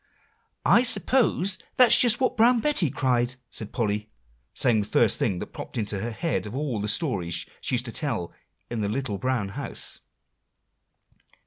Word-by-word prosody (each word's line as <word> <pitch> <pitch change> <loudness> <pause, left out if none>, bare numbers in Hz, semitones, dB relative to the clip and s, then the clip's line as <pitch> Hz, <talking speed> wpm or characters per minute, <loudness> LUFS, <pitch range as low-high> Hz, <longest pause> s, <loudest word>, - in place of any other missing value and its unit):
"I - - +6
suppose 210 -4 +3 0.2
that's 250 -2 +7
just 240 -2 +5
what 260 - 0
Brown 235 +2 +4
Betty 225 - +1
cried," 125 -2 0 0.2
said 110 - -5
Polly, 105 -2 -2 0.4
saying 120 -4 +2
the 100 - -5
first - - +2
thing 95 - 0
that - - -8
popped - - -8
into 105 -3 -3
her 115 +4 -3
head 125 0 -3
of 105 - -8
all 135 -7 -2
the 105 - -3
stories 100 - -1 0.2
she 130 - 0
used 125 +1 -1
to 115 - -4
tell 115 - -2 0.3
in 120 -2 -4
The 100 - -1
Little 110 -3 -3
Brown 130 -6 -1
House. 100 - -6
125 Hz, 165 wpm, -25 LUFS, 105-175 Hz, 0.4 s, that's